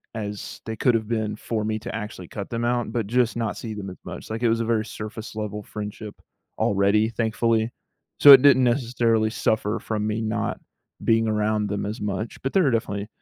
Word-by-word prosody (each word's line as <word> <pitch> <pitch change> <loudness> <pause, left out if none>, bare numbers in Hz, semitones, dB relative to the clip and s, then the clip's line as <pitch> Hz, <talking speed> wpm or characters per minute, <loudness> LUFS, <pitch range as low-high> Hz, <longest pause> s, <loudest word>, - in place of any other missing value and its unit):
as 105 -2 -6
they 110 - -4
could 120 +1 +2
have 110 -2 -1
been 110 -2 -1
for 110 0 -3
me 110 0 -1
to - - -7
actually 105 -5 -6
cut 100 +2 -6
them 115 0 -3
out, 120 -2 0
but 115 -4 -2
just 120 0 +1
not 115 -2 -2
see 110 -2 -5
them 100 -2 -6
as 90 - -10
much, - - -8
like, 110 +2 -4
it 115 - +4
was 115 +1 +1
a - - -1
very 110 -1 +1
surface-level 105 -1 -6
friendship 105 0 -7 0.4
already, 100 +2 +3
thankfully. 115 0 0 0.5
So, 145 - +10
it 130 - +9
didn’t 130 -2 +6
necessarily 120 -3 +2
suffer 110 0 0
from 105 -1 -2
me 110 +1 -1
not 110 -1 -2 0.4
being 115 0 +3
around 105 -1 +1
them 100 0 -2
as 105 +4 -4
much, 105 +2 -4
but 135 - -3
there 190 - +4
are - - +3
definitely 105 -3 -2
110 Hz, 205 wpm, -24 LUFS, 105-115 Hz, 0.5 s, So